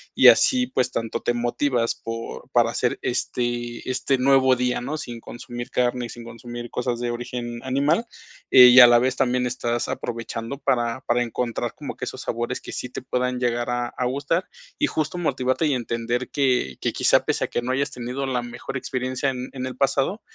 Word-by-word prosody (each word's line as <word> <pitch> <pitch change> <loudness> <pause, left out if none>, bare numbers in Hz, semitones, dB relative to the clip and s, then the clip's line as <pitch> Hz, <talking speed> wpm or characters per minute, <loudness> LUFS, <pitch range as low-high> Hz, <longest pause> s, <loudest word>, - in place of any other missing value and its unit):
y - - +7
así 250 -1 +6
pues 125 - 0
tanto 115 -1 -3
te 120 - 0
motivas 120 0 0
por 115 0 -7
para - - +4
hacer - - -1
este 120 0 -2
este 130 +1 +1
nuevo 130 0 +4
día, 125 0 0
¿no? 145 +5 -3
Sin 120 -6 -7
consumir 120 0 -7
carne 125 0 0
y - - -16
sin 120 - -9
consumir 120 +1 -8
cosas 125 -1 -2
de 120 0 -2
origen 120 0 -5
animal, 145 - +1 0.5
eh, 125 -1 +10
y 125 +1 +9
a 120 - +11
la 120 0 +6
vez 130 +1 +1
también 125 -1 +1
estás 120 -1 -2
aprovechando 115 +2 -4
para 120 -1 0
para 120 -1 +1
encontrar 120 0 -3
como - - -7
que - - -5
esos - - -6
sabores 120 +2 -3
que - - -9
sí 125 - -5
te - - -6
puedan 125 0 -1
llegar 120 -1 0
a 120 0 -1
a 125 - -3
gustar 140 +7 0 0.3
y 300 - +3
justo 155 +2 -2
motivarte 130 -3 0
y 150 - +2
entender 120 0 -2
que 125 - +1
que - - -1
quizá - - +3
pese - - 0
a - - -6
que 120 - -2
no 130 - -1
hayas 140 +2 0
tenido 125 +2 -4
la 125 -2 0
mejor 120 +2 -6
experiencia 130 +1 -2
en 130 -1 -5
en 130 -1 -4
el 130 -1 -5
pasado, 135 - +1
125 Hz, 200 wpm, -23 LUFS, 120-130 Hz, 0.5 s, a